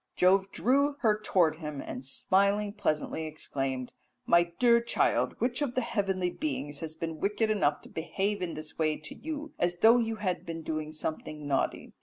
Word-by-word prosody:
"Jove 190 +2 +4
drew 280 +4 +2
her 215 -3 +3
towards 165 -4 +3
him, 150 -3 -5
and 125 - -6
smiling 200 +8 +1
pleasantly 160 -5 -1
exclaimed, 135 -4 -3 0.3
'My 170 0 +4
dear 235 -1 +5
child, 235 - +1
which 245 +3 0
of 275 -4 -1
the 255 - +2
heavenly 195 -6 0
beings 150 - -3
has 160 -1 -6
been 160 -1 -5
wicked 215 +2 +1
enough 150 -9 +1
to - - -13
behave 195 +5 -2
in 175 -2 -3
this 155 +1 -9
way 155 -1 +2
to 155 - -9
you, 310 0 -6
as 175 0 +1
though 230 +2 +7
you 225 -1 -1
had 185 -4 -2
been 165 -1 -6
doing 155 -1 -3
something 155 -1 -5
naughty?' 140 -1 -1
180 Hz, 180 wpm, -29 LUFS, 155-220 Hz, 0.3 s, though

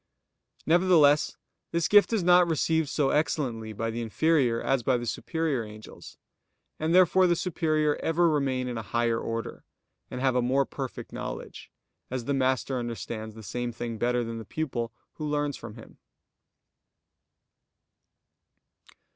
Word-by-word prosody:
Nevertheless 160 -4 +4 0.3
this 170 0 0
gift 205 +1 +5
is 220 -5 +1
not 180 0 +6
received 160 -1 +1
so 145 -3 +1
excellently 130 -8 -1
by 115 +2 -3
the 115 +1 -4
inferior 125 0 +2
as 135 -2 +1
by 125 +1 +2
the 120 - -5
superior 155 +1 -2
angels; 110 0 -12 0.6
and 160 +2 +1
therefore 185 0 +5
the 175 - +3
superior 155 -4 0
ever 170 +2 +2
remain 135 -5 0
in 120 -2 -3
a - - -3
higher 115 +2 0
order, 115 -1 -5 0.5
and - - -5
have 130 -1 +1
a 125 - +3
more 135 +3 +2
perfect 135 -2 -7
knowledge; - - -7 0.4
as 125 -2 -4
the 140 - 0
master 130 -1 0
understands 115 -2 -5
the 110 - -10
same 120 +4 -3
thing 115 -1 -5
better 120 +1 +1
than 115 0 -5
the - - -7
pupil 120 -2 -3 0.3
who 155 - -4
learns 145 -1 -1
from 110 -2 -9
him. 115 - -14
130 Hz, 145 wpm, -27 LUFS, 115-160 Hz, 0.6 s, not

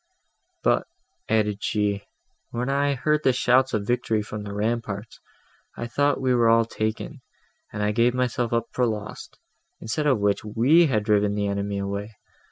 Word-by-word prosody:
"But," - - +2 0.4
added 105 -2 +1
she, 100 -1 -1 0.4
"when 125 +2 -3
I 140 0 +1
heard 150 +3 +1
the 130 - +5
shouts 125 +1 +3
of 100 -1 -2
victory 115 -2 0
from 105 0 -6
the 100 -1 -7
ramparts, 110 0 -3 0.6
I 120 - -4
thought 145 +4 +1
we 130 -1 +1
were 120 -2 +4
all 115 0 +5
taken, 110 -1 -4 0.5
and 105 0 -1
gave 120 +1 +3
myself 125 -2 -1
up 115 0 0
for 125 -1 +1
lost, 105 -2 -6 0.4
instead 150 +7 -2
of 135 -4 +4
which, 100 -1 0
we 125 +11 +4
had 110 -7 0
driven 105 -1 +2
the 105 -1 -1
enemy 100 0 -2
away. 100 +2 -4
110 Hz, 165 wpm, -24 LUFS, 105-125 Hz, 0.6 s, the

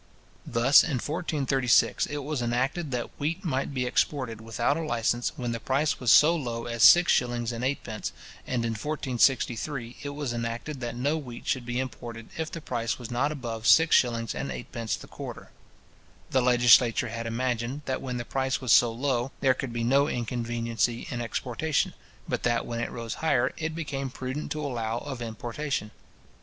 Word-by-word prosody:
Thus, 125 +4 +6
in 145 - -1
1436, 135 -5 +1
it 145 -1 -4
was 145 -2 -2
enacted, 130 +7 -1
that 125 -2 -3
wheat 170 +7 -2
might 135 -4 -1
be 130 -2 -1
exported 125 -3 -1
without 115 +5 0
a 165 - -2
licence 120 -4 0
when 125 -5 -3
the 115 - -3
price 140 +6 0
was 125 - 0
so 160 +3 +7
low 120 -7 -3
as 115 -1 -3
six 175 +8 +8
shillings 120 -1 0
and 115 +1 -5
eightpence: 125 -5 -3 0.4
and 120 -2 -1
in 115 - 0
1463, 125 0 0
it 145 - -4
was 140 -3 -3
enacted, 120 +5 -4
that 120 -1 -4
no 140 +6 0
wheat 125 -5 -9
should 125 -2 -1
be 120 +1 -1
imported 120 -3 -6
if 160 -1 -3
the 165 - -6
price 120 -5 -2
was 120 -1 -8
not 135 +5 +1
above 115 -6 -4
six 160 0 +6
shillings 115 -2 +2
and 140 - -4
eightpence 115 -2 -4
the - - -11
quarter: - - -9 0.8
The 130 - +3
legislature 120 -2 +5
had 115 0 -4
imagined, 120 +3 -2
that 130 - -2
when 125 -2 -4
the 120 - -4
price 135 +1 -1
was 130 -4 +3
so 120 -1 +6
low, 125 +1 -1
there 130 -2 +4
could 130 -1 -5
be 115 0 -2
no 140 +4 +4
inconveniency 120 -2 -1
in 120 -2 -3
exportation, 125 +6 -1 0.3
but - - -2
that 120 -1 +1
when 115 -1 -4
it 120 - -2
rose 115 -2 -5
higher, 130 -6 +2
it 160 0 -3
became 140 -4 -3
prudent 130 +3 -5
to 150 -1 -4
allow 115 -4 -2
of 130 -1 -6
importation. 115 +1 -4
125 Hz, 180 wpm, -27 LUFS, 115-140 Hz, 0.8 s, six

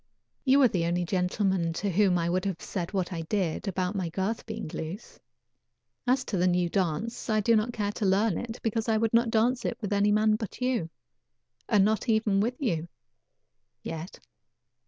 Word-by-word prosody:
You 270 +1 +5
are - - +8
the 180 -6 -1
only 175 +1 0
gentleman 180 -1 0
to 200 +4 -2
whom 190 0 +3
I 170 -1 0
would 180 +1 0
have 190 -4 -2
said 175 -4 -4
what 190 -2 -2
I 165 - -3
did 180 +1 -2
about 185 0 -1
my 185 -4 -2
girth 195 +8 -3
being 220 -3 -5
loose. 165 +6 -7 0.9
As 260 +1 +2
to 200 - -2
the 180 +1 +3
new 175 -1 +2
dance, 195 +7 -2
I 215 -1 +3
do 230 +2 +3
not 220 +2 +1
care 205 -3 -2
to 210 - -3
learn 195 +1 +3
it 230 -1 -6
because 225 0 -1
I 220 - +3
would 225 0 0
not 230 0 +4
dance 235 +3 +2
it - - -2
with 210 -3 -3
any 205 +1 +3
man 215 0 +3
but 215 -3 -7
you, 250 -9 0 0.8
and 205 -4 +5
not 220 +3 0
even 220 -3 +2
with 240 +5 -1
you 175 - -1 1.0
yet." 165 +2 -6
205 Hz, 195 wpm, -28 LUFS, 180-225 Hz, 1.0 s, are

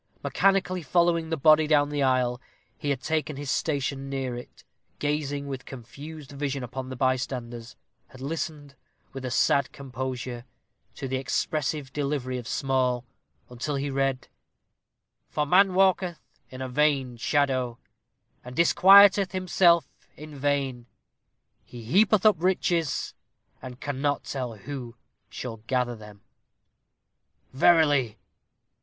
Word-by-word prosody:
Mechanically 190 -2 +1
following 170 +2 +1
the 160 - -1
body 155 +1 +5
down 145 -1 +3
the 145 -1 -2
aisle, 130 -2 +1 0.3
he 145 - -4
had 135 -2 -1
taken 155 -1 -2
his 140 -1 -4
station 140 -2 -2
near 135 -2 -3
it, 120 - -11 0.3
gazing 145 -1 -2
with 135 -2 -6
confused 140 +4 -10
vision 140 -1 -3
upon 130 +1 -6
the 130 - -6
bystanders; 125 -2 -2 0.3
had 130 - -15
listened, 145 0 -5 0.4
with 135 -1 -7
a - - -2
sad 140 +2 +2
composure, 130 -2 -5 0.5
to 135 - -5
the 130 0 -1
expressive 145 +1 -2
delivery 140 -3 -2
of 120 - -9
Small, 130 -2 0 0.4
until 125 +4 -4
he 140 +1 -2
read 135 -1 -1 1.0
"_For 150 -1 -1
man 185 +3 +4
walketh 185 -2 +2 0.3
in 130 0 -7
a - - -4
vain 135 -2 +1
shadow, 130 -2 0 0.7
and 125 0 -10
disquieteth 195 +4 +6
himself 175 -3 +3 0.3
in 155 +1 -10
vain; 135 -3 -1 0.8
he 120 -2 -11
heapeth 195 - +3
up 215 -3 +6
riches, 175 -4 0 0.5
and 125 -1 -9
cannot 145 0 -2
tell 125 -4 -4
who 125 +1 -8 0.3
shall 120 -3 -6
gather 125 -2 0
them._" 105 -2 -13 1.3
"Verily!" 145 -6 +3
140 Hz, 125 wpm, -26 LUFS, 130-155 Hz, 1.3 s, disquieteth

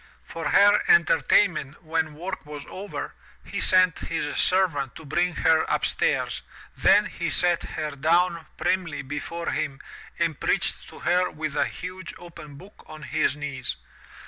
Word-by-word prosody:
For 165 - -4
her 205 +1 +6
enter 170 -1 +5
tainment 155 -2 +2
when 160 -1 -1
work 180 +5 -5
was 150 -1 -8
over, 200 +2 -6 0.3
he - - -4
sent 185 -2 +4
his 155 -3 -3
servant 165 -8 +1
to 160 - -11
bring 175 +4 0
her 160 0 +4
upstairs, - - 0 0.3
then 205 +1 +5
he 170 -4 -3
set 175 +1 +1
her 155 -1 -4
down 165 +3 +1
primly 175 -6 -1
before 160 +5 -4
him 145 -3 -2 0.4
and - - -1
preached - - -1
to - - -13
her 180 +1 +2
with 155 -1 -5
a - - +2
huge 185 0 -7
opened 165 -5 -12
book 190 +7 -15
on 155 0 -10
his 155 -3 0
knees. 140 - -4
160 Hz, 150 wpm, -25 LUFS, 150-180 Hz, 0.4 s, her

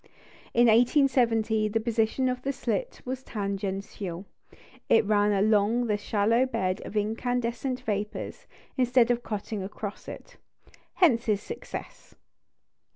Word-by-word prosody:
In 240 +1 +6
1870 230 -2 +3
the 220 +2 0
position 230 +3 0
of 250 0 -2
the 275 - -1
slit 280 - -3
was 260 +1 -4
tangential 195 -4 -4 0.6
it 225 - +5
ran 205 0 +3
along 210 +3 +2
the 215 -3 +1
shallow 220 +4 +1
bed 185 -6 -1
of 215 - -5
incandescent 240 +4 -1
vapours, 210 -3 -4 0.3
instead 245 -1 +4
of 240 0 0
cutting 210 -2 -4
across 200 +1 -7
it: - - -10 0.6
hence 250 -11 +4
his 210 -2 0
success. 460 - -8
225 Hz, 120 wpm, -27 LUFS, 205-245 Hz, 0.6 s, In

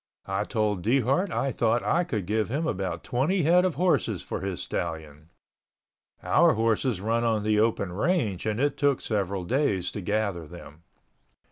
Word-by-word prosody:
I 95 +1 -2
told 105 -5 -1
Dehart 135 - +1
I 135 -4 -1
thought 115 0 +1
I 175 - +2
could 110 - -3
give 110 +3 0
him 150 +7 -1
about 95 - -3
20 155 +9 0
head 175 +4 +5
of 185 -4 0
horses 180 +1 +1
for - - -4
his 95 -2 -4
stallion. 80 -2 -5 0.9
Our - - +4
horses 115 0 +1
run 115 +4 0
on 110 -3 +1
the 105 0 +2
open 105 -4 +1
range 110 - 0
and 105 +1 -1
it 145 +1 0
took 140 -2 +2
several 100 -3 -2
days 100 -5 0
to 105 - -5
gather 100 -4 -2
them. 75 +2 -12
110 Hz, 165 wpm, -26 LUFS, 95-135 Hz, 0.9 s, head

